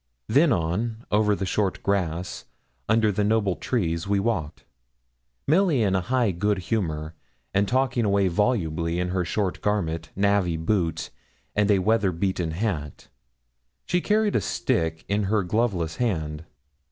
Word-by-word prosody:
Then 145 +2 +4
on, 110 +6 -1
over 105 0 +3
the 95 - -3
short 95 0 -1
grass, 90 -3 -1 0.4
under 110 -1 +4
the 105 +1 0
noble 105 -3 +2
trees, 85 -8 -1
we 100 0 +2
walked; 95 -8 -2 0.8
Milly 160 - +3
in 100 -2 +1
high 115 +4 +1
good 105 +4 0
humour, 80 -6 -2 0.4
and 100 +1 +2
talking 130 -1 +1
away 100 -2 +2
volubly, 85 -4 0
in 90 0 -1
her 90 0 0
short 95 +2 -2
garment, 85 -6 -1
navvy 100 -4 +2
boots, 80 -2 -1 0.4
and 105 0 +2
a 100 - +5
weather 105 0 +2
beaten 90 -1 -1
hat. 80 - -3 0.8
She 180 - +1
carried 210 +1 +1
a - - +3
stick 80 -2 -1
in 100 0 0
her 105 +1 +1
gloveless 90 -4 -1
hand. 80 -9 -2
100 Hz, 140 wpm, -25 LUFS, 85-110 Hz, 0.8 s, a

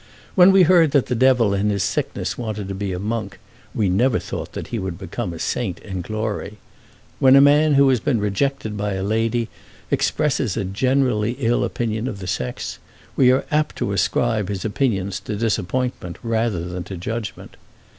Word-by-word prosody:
When 185 0 +7
we 190 -1 +6
heard 165 -3 +5
that 140 -4 +4
the 125 - -2
Devil 125 -4 +3
in 100 +1 +1
his 100 -2 0
sickness - - -2
wanted 110 -4 -4
to - - -3
be 95 0 -3
a 90 - -3
monk, 105 +1 -3 0.4
we 105 - +1
never 115 +7 +2
thought - - -6
that - - -6
he 115 - -3
would 95 -3 -4
become 95 -2 -5
a 85 - -7
saint 95 +2 -2
in 95 -3 -5
glory. 110 +1 -4 0.6
When 130 0 +6
a - - +8
man 145 +1 +5
who 140 0 +6
has 130 -2 +3
been 120 +1 0
rejected 105 +3 -1
by 105 0 -2
a 95 0 -3
lady 115 +3 0 0.4
expresses 135 -8 0
a - - -1
generally 120 +2 +1
ill 120 -2 0
opinion 115 0 -2
of 110 - -4
the 95 - -8
sex, 65 -9 -4 0.4
we 125 -2 +5
are 130 - +1
apt 150 0 +1
to - - -2
ascribe 105 -4 0
his 100 -1 -4
opinions 100 -5 -1
to 105 - -5
disappointment 110 -2 -2
rather 115 -6 0
than 90 0 -5
to 95 - -7
judgment. 105 +2 -5
110 Hz, 185 wpm, -21 LUFS, 100-130 Hz, 0.6 s, a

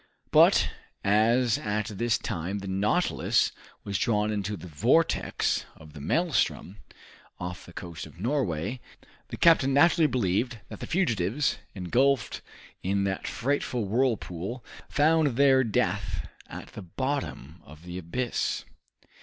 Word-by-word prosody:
But - - +6 0.4
as 115 +4 +3
at 105 0 -1
this 120 -1 +2
time 95 0 -3
the 100 -1 -6
"Nautilus" 105 - +1 0.3
was 100 -2 -2
drawn 105 -2 +1
into 105 0 -2
the 85 - -10
vortex 115 - +1
of 80 -2 -15
the 75 - -9
maelstrom, 140 - 0 0.6
off 90 0 -6
the - - -11
coast 85 -4 -7
of - - -16
Norway, 110 - -1 0.5
the - - -7
captain 140 -5 +5
naturally 165 +1 +5
believed 120 0 0
that 105 - -8
the - - -6
fugitives, 130 - 0 0.2
engulfed 120 +8 +1 0.4
in 100 +1 0
that 95 -1 -2
frightful 125 -3 -1
whirlpool, 110 -2 -1 0.2
found 150 -3 +3
their 135 -1 +5
death 90 - -1 0.2
at - - -9
the - - -9
bottom 95 - -4
of 75 +3 -14
the 90 +1 -6
abyss. 120 +9 -2
105 Hz, 130 wpm, -27 LUFS, 90-130 Hz, 0.6 s, But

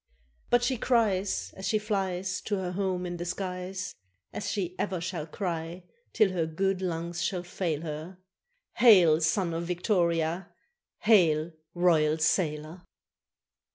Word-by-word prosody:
But 245 0 +4
she 255 +1 +1
cries, 215 -6 +1
As 190 0 -5
she 215 - +2
flies 190 -3 -2
To 210 - 0
her 185 -2 -3
home 185 -1 -1
in 175 0 -4
the 175 - -4
skies, 185 0 -4 0.4
As 210 - -3
she 180 -4 -2
ever 185 -3 -1
shall 165 -2 -4
cry 170 0 -4 0.3
till 210 -3 +3
her 170 -3 -1
good 190 +4 -1
lungs 170 -1 -3
shall 180 -1 -1
fail 175 -4 -2
her, 160 +3 -6 0.6
"Hail, 180 -9 +7
Son 170 +2 +1
of 165 +1 -3
Victoria! 175 -1 0 0.5
hail, 170 -7 +4 0.2
Royal 160 -3 +3
Sailor!" 160 0 0
180 Hz, 135 wpm, -28 LUFS, 165-195 Hz, 0.6 s, Hail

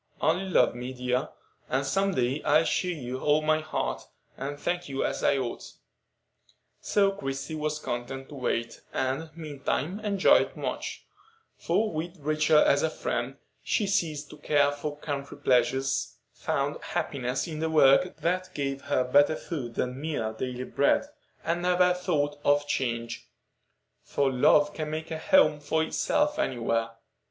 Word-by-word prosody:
Only 180 +4 +1
love - - +4
me, 125 +2 -6
dear, 125 0 -1 0.4
and 135 +2 0
some 195 +6 +1
day 130 +4 0
I'll 155 +2 +4
show 180 - 0
you 130 -7 -4
all 150 +2 +2
my 155 0 +3
heart, 155 - -3 0.3
and 145 +1 -5
thank 175 +1 -2
you 135 0 -1
as - - -2
I 140 - +3
ought." 125 -3 -4 1.1
So 200 -1 +2
Christie 135 -4 -5
was 155 -1 -2
content 135 0 -5
to - - -10
wait, 115 -3 -2
and, 135 +5 -1
meantime, 155 +3 -3
enjoyed 205 -3 +3
much; - - -4 0.5
for, 220 0 0
with 170 +4 -4
Rachel 155 +1 +2
as 145 -1 +5
a 160 - +2
friend, 130 -3 -3 0.3
she 210 - +1
ceased 155 -7 -1
to - - -11
care 145 -1 +3
for 145 +1 -5
country 140 -2 -5
pleasures, 130 0 +1 0.2
found - - -2
happiness 125 +1 -2
in 155 -2 -5
the 160 0 0
work 155 +3 +5
that 185 +2 -1
gave 135 -1 -2
her 140 -2 +2
better 145 +4 +4
food 125 -10 -5
than 125 +2 -2
mere 145 -9 -2
daily 125 +2 -4
bread, 140 - +2 0.4
and 170 +1 -1
never 180 0 +3
thought 150 -5 -1
of 145 0 +3
change; 120 -4 -3 0.7
for 140 -1 0
love 145 +3 +4
can 155 -1 -4
make 155 +1 -5
a 160 - -3
home 280 - +4
for 160 +2 0
itself 295 - 0
anywhere. 115 - 0
145 Hz, 155 wpm, -28 LUFS, 135-160 Hz, 1.1 s, as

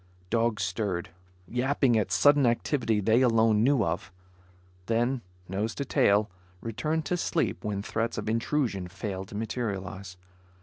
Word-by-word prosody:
Dogs 115 -3 +1
stirred, 95 -1 -2 0.4
yapping 125 - +2
at 105 -4 +1
sudden 145 +4 +5
activity 115 -2 +1
they 110 +5 +3
alone 115 -3 +4
knew 135 -3 +3
of, 95 -1 -3 0.8
then 120 +3 +1 0.3
nose 105 +4 -2
to 140 - -3
tail, 105 -4 +3 0.3
returned 155 - -2
to 180 - 0
sleep 170 -1 -1
when 100 -1 -2
threats 115 +2 -2
of 105 - -4
intrusion 115 -4 0
failed 95 +1 -5
to - - -10
materialize. 100 -4 -4
115 Hz, 135 wpm, -28 LUFS, 100-125 Hz, 0.8 s, sudden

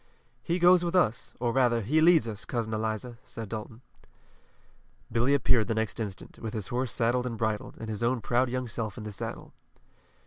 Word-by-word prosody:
"He 170 +7 0
goes 175 0 +6
with 175 +1 -1
us, 125 -11 +1
or 120 -1 +1
rather 120 -3 +3
he 155 +9 +2
leads 165 -7 +6
us, 105 -2 -5
Cousin 115 -2 -2
Eliza," 110 +2 -3
said 110 -3 -8
Dalton. 110 +2 -6 1.3
Billy 120 +5 +3
appeared 120 -5 +3
the 115 - 0
next 110 +1 -2
instant, 100 -4 -6
with 110 -1 -5
his 105 -3 -4
horse 125 -1 -1
saddled 125 +3 +1
and 115 -2 -4
bridled, 110 -1 -2
and 110 - -6
his 110 -1 -4
own 120 +2 +1
proud 120 +3 +1
young 130 0 -2
self 110 0 -4
in 110 - -6
the 105 - -5
saddle. 100 - -6
115 Hz, 195 wpm, -28 LUFS, 110-125 Hz, 1.3 s, goes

